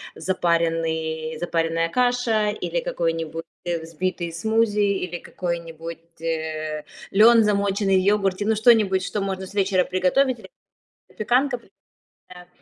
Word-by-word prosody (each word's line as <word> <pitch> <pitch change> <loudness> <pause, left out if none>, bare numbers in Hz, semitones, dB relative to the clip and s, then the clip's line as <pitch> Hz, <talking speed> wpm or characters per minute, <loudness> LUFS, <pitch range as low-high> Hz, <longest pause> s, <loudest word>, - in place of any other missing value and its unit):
запаренный 165 -3 -1
запаренная 165 -1 0
каша, 245 -2 +1
или - - -2
какой-нибудь 165 - -2 0.2
взбитый 170 +1 -3
смузи, 220 +4 +1
или 195 -4 0
какой-нибудь, 170 -1 -6
э, 155 -2 -3 0.3
лён, 225 +3 +7
замоченный 200 -1 +1
в - - +4
йогурте. 195 0 +1
Ну, 220 +1 +2
что-нибудь, 215 -4 +4
что 205 - -3
можно 190 -1 -3
с - - -13
вечера 195 -2 +2
приготовить, 235 +8 +1
или 190 -3 -13 0.6
запеканка, 250 +5 +1 0.7
да, 180 -1 -12
185 Hz, 115 wpm, -23 LUFS, 165-210 Hz, 0.7 s, лён